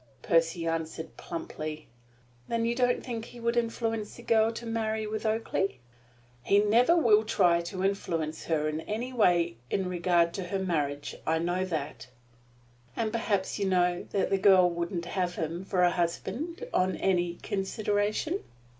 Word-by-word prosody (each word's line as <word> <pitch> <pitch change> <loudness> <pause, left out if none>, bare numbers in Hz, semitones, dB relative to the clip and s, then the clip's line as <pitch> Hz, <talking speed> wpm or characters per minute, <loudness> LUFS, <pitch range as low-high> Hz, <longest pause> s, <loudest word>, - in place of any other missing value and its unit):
Percy 165 0 +2
answered 165 0 -3
plumply. 155 -2 -6 0.6
"Then 230 0 0
you 235 - +1
don't 245 0 +1
think 230 -3 -4
he 240 - -12
would 235 0 0
influence 225 -2 -1
the 240 - -12
girl 225 -1 +3
to 235 +1 -7
marry 220 -1 -1
with 215 +1 -3
Oakleigh?" 215 -3 0 0.7
"He 195 +11 +3
never 230 +11 +4
will 220 -9 +5
try 175 -5 +3
to 185 +2 -5
influence 165 -5 -1
her 155 -2 +1
in 155 +1 -2
any 235 +8 -4
way 175 - +3
in 190 -2 0
regard 175 -1 +2
to 190 - -4
her 195 +2 -2
marriage. 150 -6 -1
That - - -3
I 160 - +3
know." 175 +3 0 1.3
"And 220 -1 -1
perhaps 210 -4 -1
you 200 - +1
know 180 -1 +1
that 195 - 0
the 195 - +2
girl 190 -2 +6
wouldn't 170 0 -3
have 180 0 -2
him 165 +3 -3
for 185 -2 +1
a 175 - +5
husband 235 - -3
on 185 0 +2
any 175 -2 +1
consideration?" 205 - -1
190 Hz, 160 wpm, -29 LUFS, 170-220 Hz, 1.3 s, girl